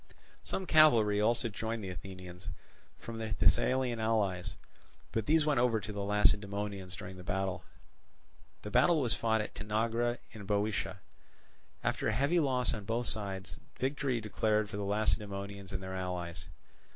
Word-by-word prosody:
Some 190 - -3
cavalry 115 - +6
also 115 +2 +2
joined 110 +1 -3
the 95 - -4
Athenians 90 -1 -9 0.5
from 115 -1 -7
their 110 -1 -2
Thessalian 125 +1 +2
allies; 100 -4 0 0.6
but 110 -2 -1
these 155 0 +4
went 150 -4 +3
over 120 -2 +3
to 105 +1 -6
the 100 - -3
Lacedaemonians 100 -2 +1
during 95 -2 -8
the 90 - -9
battle. 95 -1 -2 1.0
The 105 - -6
battle 155 +8 +5
was 125 -5 +1
fought 110 -1 +1
at 105 - -5
Tanagra 115 +3 0
in 110 -4 -9
Boeotia. 100 -2 -1 0.8
After - - 0
heavy 140 +10 +2
loss 130 -5 +1
on 105 -3 -5
both 115 +3 -1
sides, 100 -4 -2 0.2
victory 135 -2 0
declared 105 0 0
for 100 - -4
the 100 - -2
Lacedaemonians 100 -2 -1
and 95 -1 -4
their 95 0 -5
allies. 90 -3 -4
105 Hz, 150 wpm, -32 LUFS, 100-115 Hz, 1.0 s, cavalry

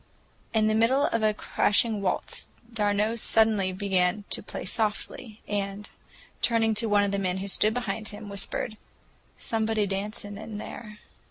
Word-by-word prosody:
In 220 -1 +3
the 215 - +3
middle 245 +6 +4
of 230 - 0
a 215 0 +4
crashing 210 0 +2
waltz 190 - -2 0.2
d'Arnault 210 +1 +1
suddenly 220 -4 +3
began 190 0 +1
to - - 0
play - - -6
softly, 215 0 -2
and, 200 0 -3 0.5
turning 225 -2 +3
to 220 +2 +1
one 205 0 +4
of 200 - 0
the 200 - 0
men 185 -1 0
who 195 +1 -4
stood 215 +3 +3
behind 220 -3 -2
him, 205 0 -8
whispered, 200 +2 -2 0.6
"Somebody 220 -1 0
dancing 205 +1 -4
in 220 -1 -7
there." 210 0 -8
210 Hz, 155 wpm, -27 LUFS, 200-220 Hz, 0.6 s, middle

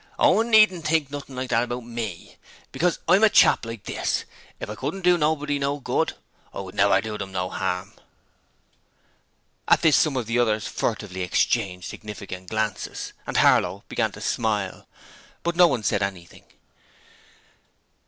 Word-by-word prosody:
Owen 225 +2 +3
needn't 215 -7 +5
think 155 -3 +1
nothing 140 -2 -7
like 130 0 -4
that 115 -1 +3
about 120 0 -4
ME, 115 -6 -6 0.4
because 175 0 0
I'm 190 +5 +5
a 220 - +7
chap 120 - +4
like 115 -2 -7
this - - -2 0.3
if - - -5
I 105 - -5
couldn't 145 - -5
do 180 0 +5
nobody 150 -3 0
no 140 +1 -1
good, - - -1 0.4
I - - -7
wouldn't - - -10
never - - +4
do 110 0 -5
'em 95 - -10
no 90 -1 -3
'arm!' 95 0 -3 1.7
At - - +4
this 160 -3 +5
some 150 -4 +2
of 125 - -1
the 115 +2 0
others 110 -3 +1
furtively 105 -4 -3
exchanged 90 0 0
significant 100 -4 -8
glances, 110 -2 -3
and - - -2
Harlow - - +3
began - - 0
to - - -10
smile, 105 -4 -2 0.6
but 170 0 -1
no 175 0 +7
one 125 -8 -1
said 105 -1 +1
anything. 95 -3 -5
120 Hz, 160 wpm, -24 LUFS, 100-150 Hz, 1.7 s, a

